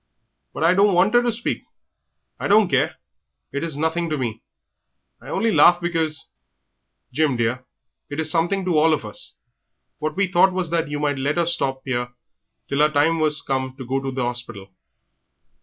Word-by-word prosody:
"But -, -, -4 dB
I 170 Hz, +2 st, +5 dB
don't 200 Hz, 0 st, +4 dB
want 190 Hz, +5 st, +3 dB
'er 240 Hz, -, +6 dB
to 240 Hz, -1 st, 0 dB
speak. 235 Hz, +2 st, -3 dB, 0.8 s
I -, -, -2 dB
don't 210 Hz, 0 st, +5 dB
care, 145 Hz, +4 st, +1 dB, 0.6 s
it's 145 Hz, +2 st, -3 dB
nothing 160 Hz, +3 st, -1 dB
to 155 Hz, -, -1 dB
me; 115 Hz, -4 st, -4 dB, 0.8 s
I -, -, -11 dB
only 230 Hz, -, 0 dB
laughed 175 Hz, -3 st, +6 dB
because 165 Hz, -3 st, -2 dB, 0.4 s
" -, -, -44 dB
"Jim, 145 Hz, -2 st, +1 dB
dear, 120 Hz, +2 st, -1 dB, 0.4 s
it 145 Hz, +1 st, -5 dB
is 160 Hz, -1 st, +2 dB
something 180 Hz, +3 st, +1 dB
to 170 Hz, -4 st, +2 dB
all 160 Hz, +1 st, +4 dB
of 140 Hz, -, -8 dB
us. 105 Hz, -, -7 dB, 0.6 s
What 155 Hz, 0 st, -3 dB
we 200 Hz, -, +2 dB
thought 185 Hz, +1 st, +3 dB
was 180 Hz, -3 st, -2 dB
that 165 Hz, -2 st, 0 dB
you 145 Hz, 0 st, -3 dB
might 145 Hz, -2 st, -1 dB
let 145 Hz, +4 st, -1 dB
her 170 Hz, -, +2 dB
stop 135 Hz, -6 st, 0 dB
'ere 125 Hz, -1 st, -3 dB, 0.5 s
till 140 Hz, -, -2 dB
her 150 Hz, +1 st, +5 dB
time 155 Hz, +2 st, +2 dB
was 150 Hz, -1 st, +1 dB
come 130 Hz, -1 st, -2 dB
to 130 Hz, -, -7 dB
go 135 Hz, +2 st, -1 dB
to 135 Hz, 0 st, -4 dB
the 130 Hz, -1 st, -3 dB
'orspital." 120 Hz, -5 st, -5 dB
155 Hz, 190 wpm, -22 LUFS, 135-175 Hz, 0.8 s, er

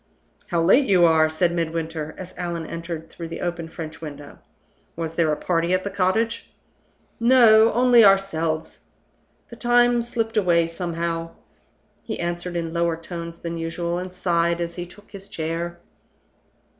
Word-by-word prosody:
"How 170 Hz, -1 st, 0 dB
late 255 Hz, +11 st, +5 dB
you 180 Hz, -3 st, +5 dB
are!" 160 Hz, -1 st, +4 dB
said 170 Hz, +2 st, +1 dB
Midwinter, 165 Hz, -2 st, -3 dB
as 185 Hz, 0 st, -9 dB
Allan 170 Hz, -2 st, -4 dB
entered 165 Hz, 0 st, -6 dB
through 165 Hz, +1 st, -8 dB
the 165 Hz, -, -7 dB
open 175 Hz, -2 st, -3 dB
French 160 Hz, -2 st, -8 dB
window. 145 Hz, -2 st, -9 dB, 0.6 s
"Was 165 Hz, -1 st, -4 dB
there 165 Hz, -2 st, +2 dB
a 150 Hz, -, -1 dB
party 170 Hz, 0 st, 0 dB
at 185 Hz, -, -2 dB
the 200 Hz, -, -4 dB
cottage?" 200 Hz, +5 st, 0 dB, 0.7 s
"No! 230 Hz, -2 st, +6 dB
only 245 Hz, 0 st, +6 dB
ourselves. 165 Hz, -5 st, +2 dB, 0.7 s
The 235 Hz, -, -11 dB
time 240 Hz, 0 st, +3 dB
slipped 230 Hz, -1 st, -2 dB
away 175 Hz, -4 st, +3 dB
somehow." 165 Hz, -1 st, -4 dB, 0.7 s
He -, -, -5 dB
answered 175 Hz, +1 st, -3 dB
in 165 Hz, -1 st, -3 dB
lower 170 Hz, -1 st, 0 dB
tones 170 Hz, 0 st, -7 dB
than 170 Hz, 0 st, -4 dB
usual, 170 Hz, +1 st, -3 dB
and 185 Hz, 0 st, -6 dB
sighed 170 Hz, -2 st, 0 dB
as 170 Hz, 0 st, -3 dB
he 175 Hz, 0 st, -6 dB
took 205 Hz, +4 st, -17 dB
his 195 Hz, -1 st, -10 dB
chair. 170 Hz, -1 st, -4 dB
170 Hz, 155 wpm, -23 LUFS, 165-195 Hz, 0.7 s, No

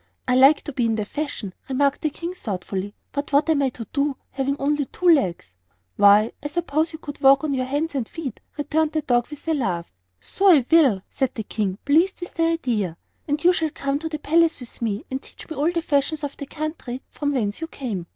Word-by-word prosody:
"I 250 Hz, -, +3 dB
like 270 Hz, +4 st, +6 dB
to 290 Hz, -, -6 dB
be 245 Hz, -3 st, +1 dB
in 225 Hz, -, +1 dB
the 215 Hz, -1 st, -2 dB
fashion," 260 Hz, -7 st, -4 dB, 0.2 s
remarked 275 Hz, +1 st, +1 dB
the 310 Hz, -, +1 dB
King, 340 Hz, +4 st, -6 dB
thoughtfully; 200 Hz, -, -4 dB, 0.2 s
"but 285 Hz, +1 st, -4 dB
what 285 Hz, +3 st, +3 dB
am 290 Hz, -3 st, +2 dB
I 270 Hz, -, +2 dB
to 235 Hz, -2 st, -8 dB
do, 280 Hz, -1 st, 0 dB
having 275 Hz, +1 st, -1 dB
only 290 Hz, +1 st, 0 dB
two 360 Hz, -, -3 dB
legs?" 185 Hz, -, +2 dB, 0.4 s
"Why, 205 Hz, +2 st, +6 dB
I 290 Hz, -, -3 dB
suppose 320 Hz, 0 st, -1 dB
you 315 Hz, -, -7 dB
could 290 Hz, -3 st, -9 dB
walk 270 Hz, +1 st, +6 dB
on 300 Hz, -2 st, 0 dB
your 255 Hz, -1 st, -1 dB
hands 295 Hz, +4 st, -1 dB
and 260 Hz, -5 st, -2 dB
feet," 285 Hz, -9 st, -6 dB, 0.2 s
returned 305 Hz, +1 st, 0 dB
the 310 Hz, -1 st, 0 dB
dog 240 Hz, -3 st, +2 dB
with 295 Hz, +1 st, -11 dB
a 325 Hz, -, +2 dB
laugh. 180 Hz, -, -2 dB, 0.3 s
"So 390 Hz, -, 0 dB
I 285 Hz, -8 st, +5 dB
will," 270 Hz, -, +5 dB
said 265 Hz, -2 st, -1 dB
the 220 Hz, -, -3 dB
King, 200 Hz, -2 st, -2 dB
being 285 Hz, +2 st, +5 dB
pleased 375 Hz, +3 st, 0 dB
with 355 Hz, -, -7 dB
the 330 Hz, -, +1 dB
idea; 230 Hz, -, -1 dB, 0.3 s
"and 295 Hz, +2 st, -1 dB
you 360 Hz, +1 st, +6 dB
shall 320 Hz, -3 st, 0 dB
come 280 Hz, -1 st, -2 dB
to 320 Hz, +1 st, -4 dB
the 310 Hz, -, -3 dB
palace 325 Hz, +2 st, +2 dB
with 245 Hz, -1 st, -10 dB
me 215 Hz, -3 st, -2 dB
and 265 Hz, +1 st, -2 dB
teach -, -, -14 dB
me 315 Hz, -, -6 dB
all 300 Hz, +4 st, +1 dB
the 335 Hz, -1 st, -2 dB
fashions 295 Hz, +1 st, 0 dB
of 285 Hz, -1 st, -4 dB
the 280 Hz, -, -7 dB
country 300 Hz, -5 st, -5 dB
from 290 Hz, -1 st, -2 dB
whence 215 Hz, -1 st, -1 dB
you 325 Hz, -, -3 dB
came." 215 Hz, -, -5 dB
280 Hz, 235 wpm, -23 LUFS, 240-310 Hz, 0.4 s, like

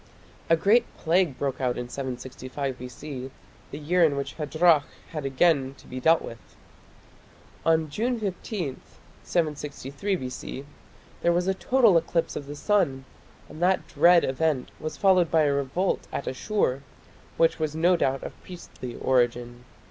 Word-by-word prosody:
A 165 Hz, -, +6 dB
great 220 Hz, +8 st, +4 dB
plague 165 Hz, -4 st, +1 dB
broke 135 Hz, -2 st, -2 dB
out 125 Hz, -1 st, 0 dB
in 125 Hz, 0 st, -4 dB
765 130 Hz, +1 st, -5 dB
B.C., 130 Hz, +1 st, -7 dB, 0.4 s
the 145 Hz, -, -7 dB
year 170 Hz, +4 st, +2 dB
in 145 Hz, -4 st, +3 dB
which 140 Hz, -, -3 dB
Hadrach 155 Hz, 0 st, +3 dB, 0.3 s
had 155 Hz, -3 st, -4 dB
again 135 Hz, -1 st, +2 dB
to -, -, -18 dB
be 130 Hz, -, -6 dB
dealt 160 Hz, +5 st, +4 dB
with. 115 Hz, -, -8 dB, 1.3 s
On 160 Hz, -1 st, +3 dB
June 230 Hz, -, -1 dB
15, 190 Hz, -, -4 dB, 0.4 s
763 150 Hz, +2 st, -2 dB
B.C., 130 Hz, -2 st, -6 dB, 0.6 s
there 170 Hz, -, +3 dB
was 175 Hz, +1 st, +1 dB
a 190 Hz, -, +3 dB
total 230 Hz, -1 st, +4 dB
eclipse 165 Hz, 0 st, -2 dB
of 140 Hz, -, -5 dB
the 145 Hz, -, -6 dB
sun, 145 Hz, -7 st, +1 dB, 0.4 s
and 155 Hz, -, -11 dB
that 185 Hz, +1 st, +2 dB
dread 175 Hz, 0 st, +5 dB
event 135 Hz, -1 st, 0 dB
was 155 Hz, -, -5 dB
followed 185 Hz, -4 st, +4 dB
by 160 Hz, -1 st, +4 dB
a 145 Hz, -1 st, +2 dB
revolt 140 Hz, +7 st, -1 dB
at -, -, -4 dB
Asshur 135 Hz, -, -1 dB, 0.6 s
which 165 Hz, 0 st, +3 dB
was 155 Hz, -1 st, -2 dB
no 175 Hz, +3 st, +4 dB
doubt 135 Hz, -5 st, 0 dB
of -, -, -9 dB
priestly 150 Hz, -8 st, -9 dB
origin. 120 Hz, -1 st, 0 dB
150 Hz, 150 wpm, -26 LUFS, 130-175 Hz, 1.3 s, A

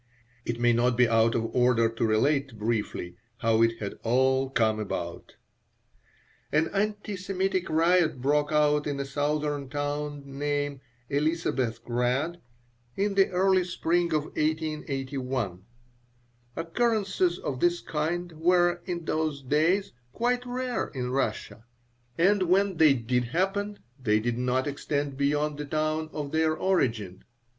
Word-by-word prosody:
It 120 Hz, 0 st, -3 dB
may 120 Hz, 0 st, +4 dB
not 120 Hz, +1 st, +2 dB
be 125 Hz, -1 st, +5 dB
out 115 Hz, 0 st, +3 dB
of 115 Hz, -1 st, -2 dB
order 125 Hz, -2 st, +4 dB
to 115 Hz, 0 st, -1 dB
relate, 135 Hz, +3 st, +1 dB
briefly. 105 Hz, -5 st, -2 dB, 0.2 s
how 115 Hz, -1 st, +2 dB
it 115 Hz, 0 st, +3 dB
had 100 Hz, -3 st, -6 dB
all 130 Hz, +3 st, +2 dB
come 110 Hz, -4 st, +1 dB
about 85 Hz, -5 st, -5 dB, 1.2 s
An 155 Hz, +2 st, +2 dB
anti 205 Hz, 0 st, -2 dB
Semitic 190 Hz, 0 st, -1 dB
riot 165 Hz, -2 st, +3 dB
broke 145 Hz, +3 st, +1 dB
out 150 Hz, -1 st, +3 dB
in 140 Hz, -1 st, -2 dB
a 140 Hz, -, -2 dB
southern 145 Hz, 0 st, -1 dB
town 145 Hz, 0 st, -3 dB
named 145 Hz, 0 st, -2 dB, 0.3 s
Elisabethgrad 130 Hz, -1 st, 0 dB, 0.6 s
in 200 Hz, +1 st, 0 dB
the 195 Hz, -1 st, +4 dB
early 185 Hz, 0 st, +3 dB
spring 175 Hz, -1 st, 0 dB
of 155 Hz, -2 st, +1 dB
1881. 135 Hz, -, -3 dB, 0.9 s
Occurrences 195 Hz, -1 st, 0 dB
of 130 Hz, -7 st, -4 dB
this 175 Hz, +2 st, +2 dB
kind 170 Hz, +3 st, -2 dB
were, 175 Hz, +1 st, +3 dB
in 170 Hz, -2 st, -4 dB
those 155 Hz, -3 st, -1 dB
days, 160 Hz, +9 st, +2 dB, 0.2 s
quite 245 Hz, -, 0 dB
rare 250 Hz, -1 st, -2 dB
in 125 Hz, -1 st, -2 dB
Russia, 130 Hz, -3 st, -2 dB, 0.5 s
and 195 Hz, +4 st, +4 dB
when 195 Hz, 0 st, +3 dB
they 155 Hz, -3 st, +6 dB
did 125 Hz, 0 st, 0 dB
happen 195 Hz, -, -1 dB, 0.2 s
they 105 Hz, -3 st, +2 dB
did 120 Hz, +2 st, -2 dB
not 125 Hz, +1 st, +1 dB
extend 145 Hz, 0 st, -2 dB
beyond 145 Hz, +2 st, 0 dB
the 150 Hz, -, -3 dB
town 155 Hz, +1 st, -1 dB
of 145 Hz, -2 st, -5 dB
their 160 Hz, 0 st, +2 dB
origin. 115 Hz, -, 0 dB
145 Hz, 135 wpm, -27 LUFS, 125-175 Hz, 1.2 s, they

